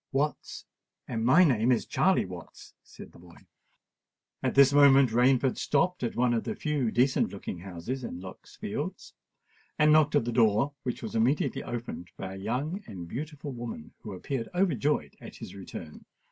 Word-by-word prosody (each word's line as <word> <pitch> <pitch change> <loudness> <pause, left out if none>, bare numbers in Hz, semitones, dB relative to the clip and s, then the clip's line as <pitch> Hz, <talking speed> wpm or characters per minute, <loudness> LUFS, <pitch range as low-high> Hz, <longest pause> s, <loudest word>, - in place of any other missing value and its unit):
"Watts—and 135 -4 -4
my 150 +10 +6
name 125 -6 +3
is 120 - +1
Charley 190 0 +2
Watts," 90 -3 -11
said - - -13
the - - -17
boy. 85 -1 -17 1.0
At - - -1
this 140 0 +7
moment 140 -3 +6
Rainford 125 +2 +3
stopped 180 +5 +1
at 120 - -2
one 120 0 +2
of 115 - 0
the - - -4
few 150 -6 -1
decent 130 +4 +2
looking 95 -3 -6
houses 95 +8 -6
in 90 - -6
Lock's 95 0 -11
Fields, - - -5 0.6
and 150 0 +5
knocked 150 -1 +4
at 140 -5 +3
the 120 - -1
door, 115 +4 +3
which 125 -3 -4
was 110 - -5
immediately 125 +6 +1
opened 120 -7 -6
by 95 0 -6
a - - -8
young 150 - -2
and 90 -5 -8
beautiful 145 - -6
woman, 120 -10 -7
who 105 - -8
appeared 115 +5 -4
overjoyed 150 - +1
at - - -10
his - - -9
return. 90 -5 -9
125 Hz, 170 wpm, -28 LUFS, 110-145 Hz, 1.0 s, this